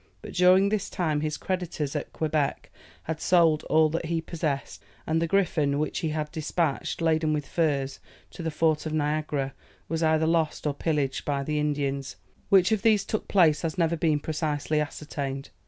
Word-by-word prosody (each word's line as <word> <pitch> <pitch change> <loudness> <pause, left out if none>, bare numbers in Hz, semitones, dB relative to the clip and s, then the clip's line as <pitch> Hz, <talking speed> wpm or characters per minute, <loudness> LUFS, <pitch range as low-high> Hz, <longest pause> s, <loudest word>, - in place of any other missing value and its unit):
But - - -8
during 185 +2 +5
this 210 -2 -1
time 155 -4 -1
his 155 0 -2
creditors 175 -6 -3
at 150 - -3
Quebec 155 -3 -1 0.3
had 160 0 -4
sold 165 -4 +4
all 160 0 +4
that 165 +2 -2
he 165 0 0
possessed, 160 -4 -3 0.2
and 160 +1 +1
the 165 - +1
Griffon, 160 -6 +1
which 155 +1 -1
he 160 - -1
had 150 0 -3
despatched, 160 0 -2
laden 160 -1 +2
with 150 -2 -2
furs, 140 -5 0 0.3
to - - -9
the 165 - -1
fort 155 0 +1
of 155 - -4
Niagara, 150 -2 -1 0.3
was 165 +1 -2
either 160 0 +3
lost 160 -2 0
or 150 - +1
pillaged 145 -3 -1
by 140 -1 -1
the 150 +1 -1
Indians; 140 -2 -2 0.3
which 190 +1 +5
of 215 -2 +2
these 215 -4 +3
took 215 - -3
place 160 -6 +4
has 165 +1 -3
never 170 -1 +2
been 155 -2 +1
precisely 155 0 -1
ascertained. 140 -2 -5
155 Hz, 180 wpm, -27 LUFS, 150-165 Hz, 0.3 s, during